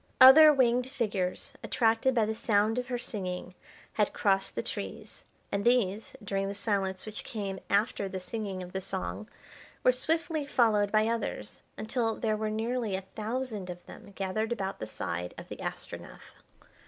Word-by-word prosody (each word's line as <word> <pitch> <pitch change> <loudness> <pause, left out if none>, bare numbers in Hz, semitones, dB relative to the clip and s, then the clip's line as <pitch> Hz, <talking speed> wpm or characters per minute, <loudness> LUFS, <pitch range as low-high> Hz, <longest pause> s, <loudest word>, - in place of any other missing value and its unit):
Other 305 +4 +11
winged 250 -3 +3
figures, 215 -2 -2
attracted 230 +2 +2
by 225 -3 +4
the 220 - -1
sound 220 +1 +2
of 250 - -4
her 250 -2 -1
singing, 185 -6 -4 0.4
had 210 -2 +1
crossed 195 -1 +1
the - - -1
trees, - - -6 0.3
and 200 0 0
these, 225 -2 +2
during 195 -1 -1
the 200 - -4
silence 195 -2 -1
which 215 -1 -6
came 195 -4 -4
after 200 -1 +1
the 190 - -4
singing 195 -1 -4
of 180 - -9
the 190 - -3
song, 90 - -4 0.5
were 255 - +7
swiftly 315 +4 0
followed 215 -7 +3
by 215 0 +4
others, 230 0 -3 0.2
until 225 0 -1
there 220 -2 0
were 215 0 -2
nearly 225 -1 -1
a 190 - -2
thousand 220 -3 -3
of 175 0 -8
them 200 - -12
gathered 205 +4 -1
about 195 -5 -2
the 110 - -4
side 90 -4 -4
of - - -9
the - - -6
Astronef. - - -7
215 Hz, 165 wpm, -30 LUFS, 195-240 Hz, 0.5 s, Other